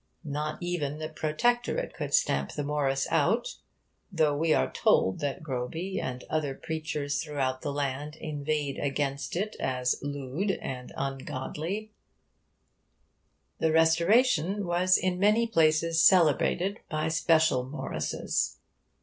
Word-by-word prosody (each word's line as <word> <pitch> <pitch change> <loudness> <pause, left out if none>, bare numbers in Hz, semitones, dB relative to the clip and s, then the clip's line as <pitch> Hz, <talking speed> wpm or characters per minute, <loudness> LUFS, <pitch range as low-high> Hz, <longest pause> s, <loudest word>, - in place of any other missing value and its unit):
Not 150 +1 -3
even 155 -5 -2
the 155 0 -5
Protectorate 165 +11 0
could - - -5
stamp 70 0 +1
the 145 - -3
Morris 140 -2 0
out, 225 +6 +1 0.5
though 155 -5 +2
we 160 +2 +1
are 65 - +2
told 95 +7 +2
that 145 0 -3
Groby 155 +8 -3
and 125 -1 -5
other 150 -3 -1
preachers 155 -3 -3
throughout 135 -4 -2
the 145 - -3
land 145 +1 -3
inveighed 150 -2 -3
against 140 0 -2
it 210 +4 -2
as 125 -1 0
'lewde' 145 +7 -2
and 125 -1 -6
'ungodlie.' 150 +9 -4 1.7
The 160 - +2
Restoration 170 +4 +3
was 180 +1 +3
in 180 -1 -1
many 210 +4 +4
places 165 -4 +3
celebrated 180 +3 +4
by 155 0 -1
special 160 -4 +3
Morrises. 135 +4 -2
155 Hz, 120 wpm, -28 LUFS, 140-175 Hz, 1.7 s, many